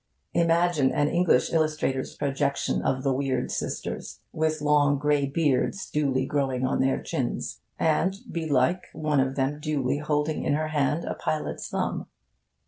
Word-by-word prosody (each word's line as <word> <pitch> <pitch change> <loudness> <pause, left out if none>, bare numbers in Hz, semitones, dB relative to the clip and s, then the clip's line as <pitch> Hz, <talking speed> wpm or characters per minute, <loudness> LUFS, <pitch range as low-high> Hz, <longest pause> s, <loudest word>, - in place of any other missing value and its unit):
Imagine 170 -4 +3
an 145 0 +2
English 175 -6 +2
illustrator's 155 -4 0
projection 140 0 0
of 130 0 0
the 135 -2 +2
weird 130 -1 -1
sisters - - -4
with 155 0 0
long 145 -1 +3
grey 145 0 +2
beards 145 +5 0
duly 135 -3 +1
growing 135 -3 0
on 130 - 0
their 130 0 +2
chins, - - -3 0.2
and 165 +4 +2 0.2
belike 160 +1 +1
one 150 -2 0
of 135 0 +1
them 140 +2 0
duly 145 -2 -1
holding 150 +1 0
in - - +1
her 155 +1 -1
hand 150 +2 0
a - - -2
pilot's 155 -1 -3
thumb. - - -2
145 Hz, 145 wpm, -26 LUFS, 135-155 Hz, 0.2 s, Imagine